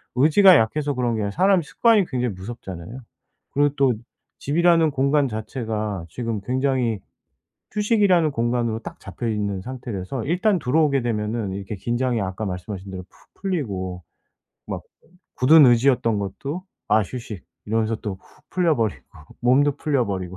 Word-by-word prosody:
의지가 160 +7 +7
약해서 145 +6 0
그런 125 -3 0
게 110 - -2
아니라 100 -1 -2
사람 190 - +3
습관이 215 +5 +3
굉장히 125 -7 -2
무섭잖아요. 95 +1 -8 0.5
그리고 145 0 +2
또 135 -3 +4 0.5
집이라는 165 +1 +3
공간 140 +1 +2
자체가 110 -4 -4
지금 115 +3 -4
굉장히 125 -1 0 0.7
휴식이라는 205 -7 +3
공간으로 120 -2 -1
딱 - - -9
잡혀 110 +5 -6
있는 100 -3 -2
상태라서 120 -1 -5
일단 185 +5 +2
들어오게 140 0 +2
되면은 110 -3 -2
이렇게 100 +2 -5
긴장이 120 +3 -1
아까 95 +2 -3
말씀하신 95 +1 -6
대로 95 -1 -6
푹 - - -27
풀리고 100 - -3 0.6
막 - - -4 0.6
굳은 150 +4 +7
의지였던 120 -2 +3
것도 140 - -5 0.2
'아 110 - +4
휴식.' 105 - -7 0.2
이러면서 110 +1 0
또 105 -2 -5
훅 - - -24
풀려 175 -3 +2
버리고 110 -4 -1 0.4
몸도 135 +4 +3
풀려 140 -6 0
버리고 95 -2 -4
120 Hz, 350 characters per minute, -23 LUFS, 105-145 Hz, 0.7 s, 의지가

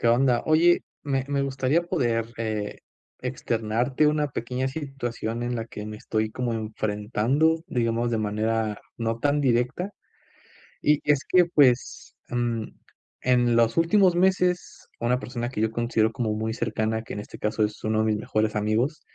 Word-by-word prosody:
¿Qué - - 0
onda? 120 +1 +3
Oye, 165 +3 +4 0.2
me 135 -2 -1
me 140 -1 0
gustaría 135 +4 +1
poder, 120 -10 0
eh, 110 -2 -3 0.4
externarte 125 +2 0
una 150 0 +2
pequeña 125 +3 -2
situación 120 -5 -4
en 120 0 -2
la 115 - -3
que 105 -2 -7
me 105 0 -6
estoy 110 0 -2
como 120 0 -2
enfrentando, 110 +8 0
digamos 120 0 0
de 115 - +1
manera 110 0 -1 0.2
no 115 0 -2
tan 145 +3 +1
directa. 130 +8 +1 0.9
Y 150 0 +4
y - - +3
es 145 - -3
que, 180 -1 +5
pues, 140 -8 +2
mm, 120 -2 -1 0.6
en 120 -2 +3
los 115 -1 +3
últimos 180 +2 +4
meses, 180 0 +1
una 125 +2 +1
persona 120 -1 -4
que 110 - -3
yo 110 0 +1
considero 115 -1 +1
como 110 0 -1
muy 110 +1 -2
cercana, 110 -1 -1
que 115 - -8
en 105 - -4
este - - -11
caso 105 +1 0
es 105 0 -7
uno 110 0 +1
de - - +1
mis 110 -1 +1
mejores 110 +1 -1
amigos, 115 +9 0
120 Hz, 165 wpm, -25 LUFS, 110-140 Hz, 0.9 s, que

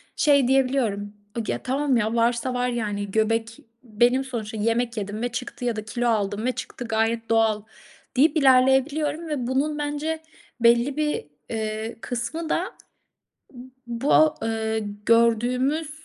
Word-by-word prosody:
şey 280 -4 +4
diyebiliyorum, 255 -7 +1 0.3
o - - 0
gi - - -2
"Ya, - - -4
tamam 270 0 +1
ya, 220 +1 0
varsa 235 +2 +1
var 250 0 0
yani, 205 -4 -3
göbek 225 +1 0 0.2
benim 240 +4 +2
sonuçta, 225 -4 -5
yemek 230 +2 0
yedim 205 +2 -4
ve 245 - 0
çıktı 245 +1 -5
ya 240 -2 0
da 215 0 -5
kilo 240 +2 -2
aldım 210 -1 0
ve 255 - +2
çıktı, 245 -1 -7
gayet 225 +1 0
doğal." 220 -2 +2 0.5
deyip 305 +4 +4
ilerleyebiliyorum 280 +4 +3
ve 260 -6 -2
bunun 285 +4 0
bence 295 +2 -2 0.4
belli 240 +4 +4
bir, 300 - -1 0.2
eee, 220 0 -3
kısmı 280 +7 -4
da 365 +3 -1 1.2
bu, 280 +6 +3
eee, 220 0 -1 0.3
gördüğümüz 250 +6 +2
240 Hz, 140 wpm, -24 LUFS, 225-270 Hz, 1.2 s, şey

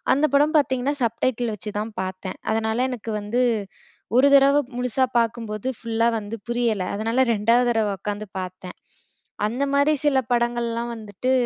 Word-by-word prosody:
அந்த 285 +3 +3
படம் 295 +3 +3
பாத்தீங்கன்னா, 265 0 0
சப் 230 -1 -1
டைட்டில் 240 -3 0
வச்சுதான் 210 +2 -5
பாத்தேன். 185 0 -6
அதனால 220 +3 0
எனக்கு 230 -2 -5
வந்து 215 +5 0 0.8
ஒரு 265 +2 +6
தரவ 275 +1 +6 0.2
முழுசா 250 +1 +1
பாக்கும்போது, 225 -1 -2
ஃபுல்லா 230 0 0
வந்து 210 +1 -6
புரியல. 235 -5 0
அதனால 225 +5 +1
2வது 230 +4 +3
தரவ 225 -2 +1
உக்காந்து 205 +2 -4
பாத்தேன். 185 0 -7 0.7
அந்தமாரி 280 +6 +2
சில 275 -2 +4
படங்கள்லாம் 235 -1 0
வந்துட்டு, 215 +3 -3
230 Hz, 135 wpm, -23 LUFS, 215-255 Hz, 0.8 s, ஒரு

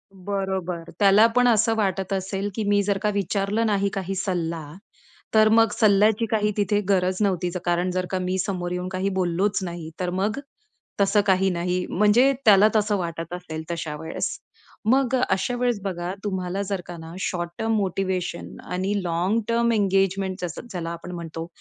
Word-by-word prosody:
बरोबर. 190 -3 -3
त्याला 200 +2 +6
पण 250 0 +5
असं 225 -1 +3
वाटत 195 -1 -1
असेल, 195 +1 -2
की 220 - -1
मी 205 0 +4
जर 200 0 0
का 210 - +1
विचारलं 200 +3 0
नाही 200 -2 +1
काही 195 0 -3
सल्ला, 170 -4 -2 0.7
तर 215 0 +6
मग 225 -1 +5
सल्ल्याची 215 +2 +4
काही 210 -1 +2
तिथे 205 0 +2
गरज 185 -1 +2
नव्हती. 185 -3 +1 0.2
कारण 175 +1 +1
जर 185 0 -1
का 185 - 0
मी 185 +1 -1
समोर 180 -3 -3
येऊन 180 0 -3
काही 190 +1 -1
बोललोच 185 +4 +1
नाही, 170 -2 -6
तर 180 -1 -1
मग 200 +7 -1 0.6
तसं 200 +1 +4
काही 190 0 +3
नाही 180 0 -1
म्हणजे 210 +8 +4
त्याला 205 0 +7
तसं 210 -1 +2
वाटत 170 -1 -4
असेल 160 -3 -6
तशा 160 -3 -4
वेळेस. 160 +1 -3 0.5
मग 260 +2 +3
अ, 255 - +1
अशा 195 +6 0
वेळेस 245 -4 +1
बघा 180 -2 -3
तुम्हाला 190 -1 -2
जर 195 -2 -3
का 175 -1 -8
ना, 160 +1 -9
शॉर्ट 175 -2 -2
टर्म 225 0 0
मोटिव्हेशन 190 -2 -2 0.2
आणि 185 +3 -1
लाँग 175 +6 +1
टर्म 235 0 +2
एंगेजमेंट 195 -2 +1
ज्याला 175 0 -6
आपण 170 +1 -7
म्हणतो 165 -1 -6
190 Hz, 170 wpm, -24 LUFS, 180-205 Hz, 0.7 s, त्याला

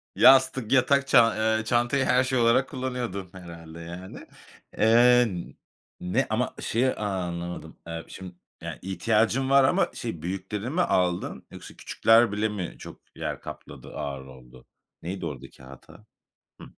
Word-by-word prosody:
Yastık, 130 -3 +5
yatak 140 +1 +3
ça 120 -3 +5 0.2
eee, 110 - -4
çantayı 120 +3 +1
her 130 0 +3
şey 130 0 -1
olarak 120 +3 +3
kullanıyordun 125 -8 -4
herhâlde 85 -3 -11
yani. 85 +3 -9 0.5
Eee, 120 +2 +5 0.7
ne, 90 0 -1
ama - - -1
şeyi 130 +3 +1
anlamadım, 90 -5 -5
eee, 85 0 -6
şim 90 -2 -10 0.3
yani, - - -7
ihtiyacın 110 +7 0
var 135 0 +6
ama, 180 +9 +2
şey, 110 -10 -6
büyüklerini 95 +5 -4
mi 175 +6 0
aldın 90 - -1
yoksa - - -11
küçükler 115 -1 +3
bile 105 +1 0
mi 95 -5 -5
çok - - -11
yer - - -5
kapladı, - - -10
ağır 70 -3 -5
oldu? 65 -1 -15 0.4
Neydi 90 +1 -5
oradaki 65 -3 -9
hata? 65 0 -15 0.6
Hıh. - - -10
105 Hz, 140 wpm, -26 LUFS, 85-125 Hz, 0.7 s, var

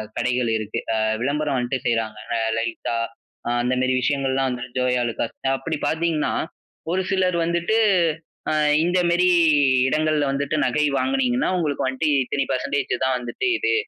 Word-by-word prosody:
கடைகள் 125 -1 0
இருக்கு. 110 -1 -4
அ - - +1 0.3
விளம்பரம் 145 +1 0
வந்துட்டு 125 +1 -1
செய்றாங்க, 115 -2 -1 0.2
அ - - -1 0.2
லலிதா, 115 0 -2 0.6
அந்த 125 +1 0
மாரி 130 0 +1
விஷயங்கள்லாம் 135 0 0
வந்துட்டு, 125 0 -6
ஜோயாலுக்காஸ், 125 -2 0 0.2
அப்டி 160 +3 -3
பாத்தீங்கன்னா, 160 0 0 0.6
ஒரு 190 +2 0
சிலர் 185 -2 +1
வந்துட்டு, 170 +6 0 0.7
அ - - +1 0.3
இந்த 175 +2 +2
மாரி 180 +1 +3 0.6
இடங்கள்ல 155 +1 +1
வந்துட்டு 140 +2 -1
நகை 150 0 +1
வாங்கினீங்கன்னா, 265 -1 +1
உங்களுக்கு 150 -5 -1
வந்துட்டு 130 +4 -1 0.2
இத்தனை 140 +2 -1
பர்சன்டேஜ் 135 +1 -1
தான் 130 0 +1
வந்துட்டு 125 - -3
இது, 440 +1 +1
140 Hz, 140 wpm, -22 LUFS, 125-170 Hz, 0.7 s, மாரி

